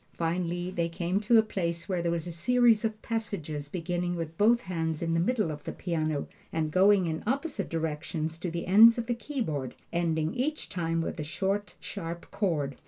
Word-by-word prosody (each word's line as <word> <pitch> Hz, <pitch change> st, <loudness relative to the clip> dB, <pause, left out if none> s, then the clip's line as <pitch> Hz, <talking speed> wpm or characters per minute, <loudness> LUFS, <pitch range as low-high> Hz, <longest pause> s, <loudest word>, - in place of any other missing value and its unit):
Finally 175 Hz, +1 st, -1 dB
they 170 Hz, -2 st, -1 dB
came 175 Hz, +3 st, -1 dB
to 215 Hz, +2 st, +4 dB
a 220 Hz, -, +6 dB
place 170 Hz, -5 st, -3 dB
where 185 Hz, -3 st, 0 dB
there 170 Hz, -, 0 dB
was 170 Hz, -2 st, -1 dB
a 175 Hz, -, -5 dB
series 230 Hz, +6 st, +3 dB
of 220 Hz, -1 st, -1 dB
passages 165 Hz, -11 st, -3 dB
beginning 175 Hz, +1 st, -2 dB
with 165 Hz, -1 st, -4 dB
both 230 Hz, +6 st, +4 dB
hands 165 Hz, -5 st, -2 dB
in 165 Hz, 0 st, 0 dB
the 165 Hz, -, +2 dB
middle 215 Hz, -2 st, +1 dB
of 150 Hz, -1 st, -7 dB
the -, -, -4 dB
piano, 155 Hz, -4 st, -2 dB, 0.2 s
and 155 Hz, -1 st, -1 dB
going 190 Hz, +2 st, +5 dB
in 160 Hz, -1 st, -2 dB
opposite 270 Hz, -, -1 dB
directions 160 Hz, 0 st, -3 dB
to 180 Hz, -, -3 dB
the 170 Hz, 0 st, -4 dB
ends 225 Hz, +5 st, +8 dB
of 235 Hz, -, -2 dB
the 240 Hz, -, 0 dB
keyboard, 215 Hz, -, -3 dB, 0.2 s
ending 160 Hz, -2 st, 0 dB
each 295 Hz, +5 st, -2 dB
time 165 Hz, -3 st, -1 dB
with 165 Hz, -, -4 dB
a -, -, -1 dB
short, 195 Hz, +7 st, -2 dB
sharp 170 Hz, -3 st, -6 dB
chord. 150 Hz, -, -1 dB
175 Hz, 195 wpm, -29 LUFS, 165-205 Hz, 0.2 s, ends